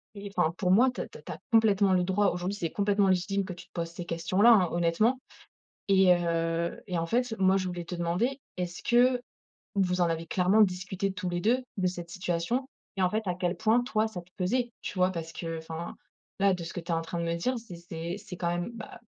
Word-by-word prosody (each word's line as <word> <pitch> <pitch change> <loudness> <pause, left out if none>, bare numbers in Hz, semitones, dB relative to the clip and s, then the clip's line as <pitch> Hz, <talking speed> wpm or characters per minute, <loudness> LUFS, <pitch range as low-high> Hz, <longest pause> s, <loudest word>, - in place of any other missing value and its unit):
et 200 0 -7
enfin 170 -3 +2
pour 180 -2 +1
moi, 240 +7 +6
tu - - -5
as - - -5
tu - - -12
as - - -14
tu - - -7
as - - -7
complètement 205 -4 +4
le 180 -1 +3
droit 190 +3 +2
aujourd'hui, 180 +3 -3
c'est 170 -5 -2
complètement 200 -1 +2
légitime 190 +2 +1
que 185 - -5
tu 175 - -12
te - - -49
poses 170 -1 -3
ces 175 +1 -7
questions 170 +3 -1
là 235 +2 +9
hein, 185 -6 +4
honnêtement 175 +9 +2 0.7
et 190 -2 +6
heu, 170 -1 -1
et 180 -3 -2
en 165 - -1
fait, 240 +5 0
moi, 190 0 +4
je 185 -1 -1
voulais 175 -1 -4
te 180 - -5
demander, 180 +11 -1 0.2
est-ce 180 0 -4
que 245 +1 +4 0.6
vous 185 -2 +1
en 175 - +4
avez 165 0 -2
clairement 190 +6 +3
discuté 190 0 0
tous 185 -1 -3
les 175 0 -2
2, 245 +6 +2 0.2
de 185 -2 +2
cette 175 -1 -5
situation? 185 +8 -1 0.3
Et - - 0
en 180 - +4
fait, 215 +3 -1
à 180 - 0
quel 180 0 -1
point, 225 +5 +3
toi, 220 -2 +1
ça 195 -5 -7
te 175 - -23
pesait? 235 +6 0
Tu - - -6
vois? 185 0 +3
Parce 165 -2 -6
qu'enfin, 165 0 -5 0.4
là, 195 0 +4
de 180 -2 -4
ce 165 - -6
que - - -4
tu 170 +1 -5
es - - +2
en 165 - 0
train 165 +1 -5
de 170 - -1
me 170 0 0
dire, 250 +10 -1
c'est 225 -6 -10
c'est 170 +1 -5
c'est 195 -3 -9
quand 175 - -2
même, 175 +6 -2
bah, 220 -2 -9
185 Hz, 250 wpm, -29 LUFS, 170-205 Hz, 0.7 s, là